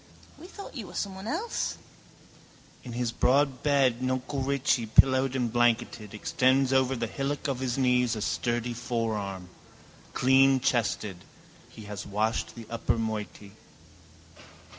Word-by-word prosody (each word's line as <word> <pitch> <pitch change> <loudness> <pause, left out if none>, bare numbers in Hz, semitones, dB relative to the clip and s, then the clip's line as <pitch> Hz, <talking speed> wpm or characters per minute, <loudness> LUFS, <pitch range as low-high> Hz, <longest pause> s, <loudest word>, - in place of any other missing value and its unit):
—We 350 - -11
thought 400 +1 -10
you 235 -9 -6
were - - -12
someone 195 0 -4
else. 395 - -2 1.1
In 120 - -8
his 120 -1 -1
broad 135 +2 +2
bed 135 -4 +2
nuncle 130 +1 -2
Richie, 135 -3 +1
pillowed 130 +3 +4
and 120 -3 -1
blanketed, 115 -3 +1
extends 130 +4 +2
over 130 0 +3
the 115 -1 -2
hillock 140 +5 -3
of 135 -3 -2
his 130 -1 -2
knees 125 -3 +2
a 110 - -4
sturdy 120 0 -1
forearm. 110 -6 -3 0.7
Cleanchested. 125 -8 +3 0.5
He 110 - -12
has 105 -1 -7
washed 110 +3 -1
the 115 -2 -9
upper 115 0 -1
moiety. 105 -2 -4
125 Hz, 130 wpm, -28 LUFS, 115-135 Hz, 1.1 s, pillowed